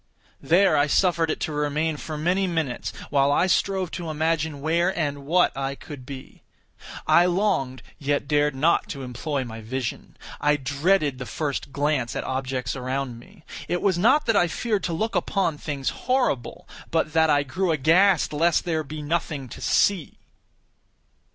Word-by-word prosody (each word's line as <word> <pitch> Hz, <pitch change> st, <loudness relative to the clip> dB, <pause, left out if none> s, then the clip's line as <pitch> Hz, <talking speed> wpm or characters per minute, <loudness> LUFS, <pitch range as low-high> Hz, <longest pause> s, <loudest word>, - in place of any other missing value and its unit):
There 190 Hz, +4 st, +4 dB
I 145 Hz, +1 st, +3 dB
suffered 170 Hz, +1 st, +2 dB
it -, -, -1 dB
to 160 Hz, -, -2 dB
remain 150 Hz, +2 st, -1 dB
for 155 Hz, +1 st, -6 dB
many 180 Hz, +5 st, +1 dB
minutes, 160 Hz, -8 st, -2 dB, 0.2 s
while 140 Hz, -1 st, +3 dB
I 160 Hz, -, +3 dB
strove 190 Hz, -1 st, 0 dB
to 170 Hz, -3 st, -5 dB
imagine 155 Hz, -1 st, -1 dB
where 165 Hz, +4 st, +1 dB
and 145 Hz, -3 st, -2 dB
what 180 Hz, +3 st, +3 dB
I 135 Hz, 0 st, -3 dB
could 135 Hz, -3 st, -10 dB
be. 135 Hz, -2 st, -10 dB, 0.6 s
I 175 Hz, +1 st, +5 dB
longed, 175 Hz, -, 0 dB, 0.2 s
yet 145 Hz, 0 st, -1 dB
dared 150 Hz, -1 st, +2 dB
not 160 Hz, +6 st, +2 dB
to 140 Hz, -2 st, -6 dB
employ 130 Hz, +3 st, -3 dB
my 115 Hz, -2 st, -8 dB
vision. 120 Hz, +2 st, -5 dB, 0.2 s
I 150 Hz, 0 st, +3 dB
dreaded 145 Hz, +1 st, +1 dB
the 125 Hz, -, -6 dB
first 145 Hz, -2 st, -3 dB
glance 145 Hz, -4 st, -1 dB
at -, -, -2 dB
objects 130 Hz, -1 st, -3 dB
around 130 Hz, -1 st, -3 dB
me. 180 Hz, -, -18 dB, 0.2 s
It 175 Hz, -, -1 dB
was 185 Hz, -4 st, +2 dB
not 235 Hz, +10 st, +4 dB
that 225 Hz, -, +2 dB
I 175 Hz, -, +4 dB
feared 210 Hz, +4 st, -1 dB
to 170 Hz, -, -2 dB
look 220 Hz, +7 st, -1 dB
upon 170 Hz, -7 st, 0 dB
things 140 Hz, -3 st, -3 dB
horrible, 180 Hz, -, -1 dB, 0.2 s
but 160 Hz, -1 st, 0 dB
that 160 Hz, -1 st, +4 dB
I 145 Hz, -1 st, +3 dB
grew 175 Hz, +7 st, -1 dB
aghast 165 Hz, +5 st, +3 dB
lest 165 Hz, +3 st, +2 dB
there 165 Hz, -2 st, 0 dB
should 150 Hz, -, -11 dB
be 150 Hz, 0 st, -6 dB
nothing 150 Hz, -3 st, -2 dB
to -, -, -10 dB
see. 190 Hz, -7 st, +1 dB
155 Hz, 170 wpm, -24 LUFS, 140-175 Hz, 0.6 s, I